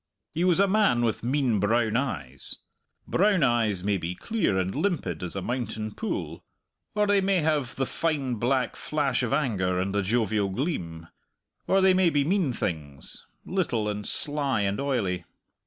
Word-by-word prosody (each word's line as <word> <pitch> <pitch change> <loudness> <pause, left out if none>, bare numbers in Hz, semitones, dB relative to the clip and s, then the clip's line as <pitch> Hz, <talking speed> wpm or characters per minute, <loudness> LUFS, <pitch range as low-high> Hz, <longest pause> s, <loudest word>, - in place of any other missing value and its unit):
He 170 - 0
was 180 -1 +3
a 200 - +5
man 195 - +3
with 110 -1 -1
mean 125 -3 +1
brown 110 +2 +2
eyes. 75 - -2 0.5
Brown 195 -3 +3
eyes 115 -7 +2
may 100 0 +1
be 85 0 -4
clear 195 - 0
and 95 0 -1
limpid 145 - -1
as 90 0 -4
a 95 - -3
mountain 115 -3 -3
pool, 220 - -4 0.5
or 210 0 +3
they 205 -1 +3
may 190 -2 +2
have 150 -5 0
the 135 - 0
fine 145 -4 -1
black 125 +2 0
flash 145 -4 -1
of 125 - -1
anger 100 -11 +1
and 95 +1 -1
the 100 - +1
jovial 105 -1 +1
gleam, 90 - -3 0.6
or 195 0 +4
they 190 0 +5
may 185 -1 +4
be 145 -3 +1
mean 180 -4 +1
things 75 - -5 0.2
little 135 - -1
and 105 0 -3
sly 140 -6 +1
and 100 0 0
oily. 110 -11 -1
120 Hz, 170 wpm, -27 LUFS, 100-155 Hz, 0.6 s, a